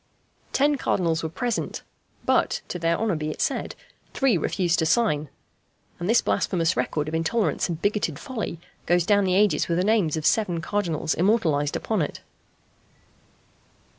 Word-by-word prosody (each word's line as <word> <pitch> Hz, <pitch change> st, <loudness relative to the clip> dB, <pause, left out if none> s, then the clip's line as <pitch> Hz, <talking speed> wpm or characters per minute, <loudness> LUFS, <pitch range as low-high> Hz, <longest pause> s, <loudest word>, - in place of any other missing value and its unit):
Ten 290 Hz, +1 st, +2 dB
Cardinals 165 Hz, -9 st, 0 dB
were 160 Hz, -, -3 dB
present; 240 Hz, +8 st, -3 dB, 0.4 s
but, -, -, +2 dB
to 180 Hz, -, -4 dB
their 165 Hz, 0 st, +1 dB
honour 220 Hz, -5 st, 0 dB
be 155 Hz, 0 st, -3 dB
it -, -, -6 dB
said, -, -, -1 dB, 0.4 s
three 270 Hz, -6 st, +3 dB
refused 175 Hz, 0 st, 0 dB
to 160 Hz, -, +2 dB
sign; 155 Hz, -, +1 dB, 0.7 s
and 175 Hz, +3 st, -3 dB
this 235 Hz, -, +4 dB
blasphemous 170 Hz, -2 st, +1 dB
record 150 Hz, -1 st, -1 dB
of 155 Hz, -, -5 dB
intolerance 170 Hz, +6 st, 0 dB
and 165 Hz, -2 st, -3 dB
bigoted 200 Hz, -8 st, 0 dB
folly 220 Hz, -, -5 dB, 0.3 s
goes 175 Hz, -1 st, +3 dB
down 205 Hz, 0 st, +3 dB
the 185 Hz, -1 st, +1 dB
ages 195 Hz, -6 st, +3 dB
with 170 Hz, -, 0 dB
the 180 Hz, -, +2 dB
names 200 Hz, -7 st, +2 dB
of 155 Hz, -, -4 dB
seven 185 Hz, -7 st, +2 dB
Cardinals 165 Hz, -3 st, -1 dB
immortalized 165 Hz, -7 st, +1 dB
upon 215 Hz, -5 st, -1 dB
it. 150 Hz, -, -4 dB
175 Hz, 160 wpm, -25 LUFS, 160-210 Hz, 0.7 s, this